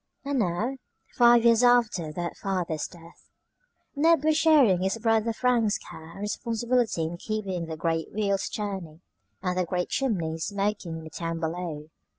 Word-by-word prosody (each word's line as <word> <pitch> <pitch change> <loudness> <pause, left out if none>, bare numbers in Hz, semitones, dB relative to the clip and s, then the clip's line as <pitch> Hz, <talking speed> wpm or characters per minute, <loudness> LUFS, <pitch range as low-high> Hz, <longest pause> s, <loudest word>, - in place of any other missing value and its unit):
And 280 -1 0
now, 215 +7 -1 0.4
five 240 -1 +5
years 230 0 +5
after 235 -10 +3
that 170 +2 -4
father's 175 -6 -2
death, 170 -1 -17 0.7
Ned 320 +1 +4
was 310 0 +3
sharing 290 - +5
his 190 +4 0
brother 225 0 +1
Frank's 230 -3 +1
care 160 +1 -12
and 195 - -10
responsibility 230 -1 0
in 165 +2 -4
keeping 190 -4 -3
the 160 -1 -5
great 165 0 -1
wheels 200 -2 -1
turning 190 -6 -5 0.4
and 180 -1 0
the 185 - +1
great 180 0 -2
chimneys 170 - -1
smoking 200 -4 -2
in 160 - -9
the 160 - -10
town 165 0 -4
below. 160 -2 -4
195 Hz, 160 wpm, -27 LUFS, 170-230 Hz, 0.7 s, five